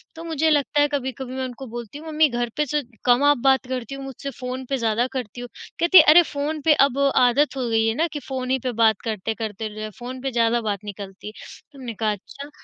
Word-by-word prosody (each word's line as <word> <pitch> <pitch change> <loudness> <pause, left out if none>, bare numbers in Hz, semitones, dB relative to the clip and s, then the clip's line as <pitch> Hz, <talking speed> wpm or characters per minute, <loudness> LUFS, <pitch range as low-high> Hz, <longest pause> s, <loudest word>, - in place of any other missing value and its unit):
तो 325 - -8
मुझे 320 -1 0
लगता 290 -1 +2
है 290 - +4
कभी-कभी 265 -3 -4
मैं 260 - -3
उनको 255 +1 -8
बोलती 235 +2 -8
हूँ, 315 +2 -10
"मम्मी 310 0 +3
घर 240 -1 -2
पर 300 - +2
से 295 +2 -1 0.2
कम 245 +2 +4
आप 290 0 +5
बात 265 -1 +3
करती 255 0 -4
हो 275 - -8
मुझसे 270 +1 -7
फ़ोन 255 0 -5
पे 275 - 0
ज़्यादा 230 0 +1
करती 245 -2 -5
हो", 245 - -6 0.3
कहती 345 +2 +6
है, 320 - +11
"अरे! 315 +4 +8
फ़ोन 300 0 -4
पे 320 - +6
अब 275 -1 -4 0.3
आदत 275 +4 +2
हो 255 -2 -1
गई 225 0 +2
है 225 - 0
ना 325 +6 +1
कि 295 - -3
फ़ोन 260 -1 -4
ही 265 - +2
पे 255 - -1
बात 220 -2 +3
करते-करते 220 0 -3
जो 215 - -7
है, 215 - -4
फ़ोन 250 +1 -7
पे 270 0 -2
ज़्यादा 235 0 +2
बात 205 -3 -2
निकलती 200 -1 -8
है," 210 - -7 0.4
हमने 250 -4 -7
कहा, 215 0 -1
"अच्छा।" 275 +8 -9
255 Hz, 245 wpm, -23 LUFS, 230-285 Hz, 0.4 s, है